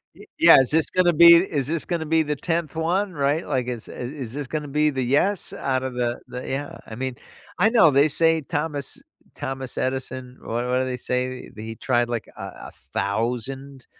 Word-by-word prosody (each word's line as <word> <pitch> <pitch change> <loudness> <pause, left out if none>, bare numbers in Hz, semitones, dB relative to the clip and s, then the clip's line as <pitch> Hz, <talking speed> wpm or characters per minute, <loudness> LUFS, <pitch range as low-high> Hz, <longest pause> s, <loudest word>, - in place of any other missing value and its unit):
Y - - -14
yeah, - - +9
is 130 -2 +2
this 160 +1 +2
gonna 180 -1 +3
be 170 +2 +9
is 160 -6 +1
this 165 +1 -1
gonna 170 -3 -2
be 160 +1 +2
the 150 0 -2
10th 165 0 -2
one? 180 +5 0
Right, 145 +1 0
like, 130 -4 -1
is 120 -3 -5
i - - -10
is 125 -2 -6
this 145 -1 -5
gonna 150 +1 -4
be 150 +2 +2
the 135 -3 -2
"yes" 150 +10 +1
out 130 -1 -1
of 130 -1 -4
the 120 -1 -2
the 125 0 -7
Yeah. 140 +2 -4
I 110 - -8
mean, 130 +1 -4 0.4
I 205 +5 +5
know 225 -10 +5
they 140 +2 +5
say 160 +1 +2
Thomas 145 -1 -3 0.4
Thomas 130 -1 -5
Edison 130 -1 -3
what 120 +2 -3
what 125 +1 +1
do 130 - 0
they 130 -1 -3
say? 125 +1 -3
He 110 +1 -7
tried, 120 0 0
like 120 -2 -3
a - - -10 0.3
1,000 125 +5 -4
135 Hz, 200 wpm, -23 LUFS, 125-160 Hz, 0.4 s, yeah